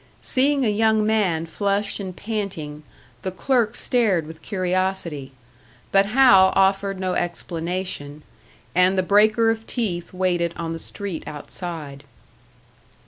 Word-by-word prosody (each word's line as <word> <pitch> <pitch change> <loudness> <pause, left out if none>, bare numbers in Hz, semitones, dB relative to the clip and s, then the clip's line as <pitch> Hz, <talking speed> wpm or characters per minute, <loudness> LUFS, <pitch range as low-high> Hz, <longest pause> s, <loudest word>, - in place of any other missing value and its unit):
Seeing 275 +1 +2
a - - +2
young 215 0 +2
man 195 -7 +1
flushed 200 +4 -1
and 185 -3 -6
panting, 190 -9 -4 0.4
the - - -2
clerk 230 +5 0
stared 210 - +2
with 160 +1 -11
curiosity; 185 -7 -2 0.6
but 195 0 +4
Hal 215 -5 +6
offered 195 0 +2
no 185 -1 -1
explanation, 170 -3 -4 0.5
and 185 +2 +3
the 185 - +2
breaker 215 +4 +4
of 225 0 -5
teeth 180 -8 -3
waited 175 -2 0
on 165 -1 -3
the 165 - -5
street 195 -1 -5
outside. 150 -2 -6
190 Hz, 125 wpm, -23 LUFS, 170-215 Hz, 0.6 s, Hal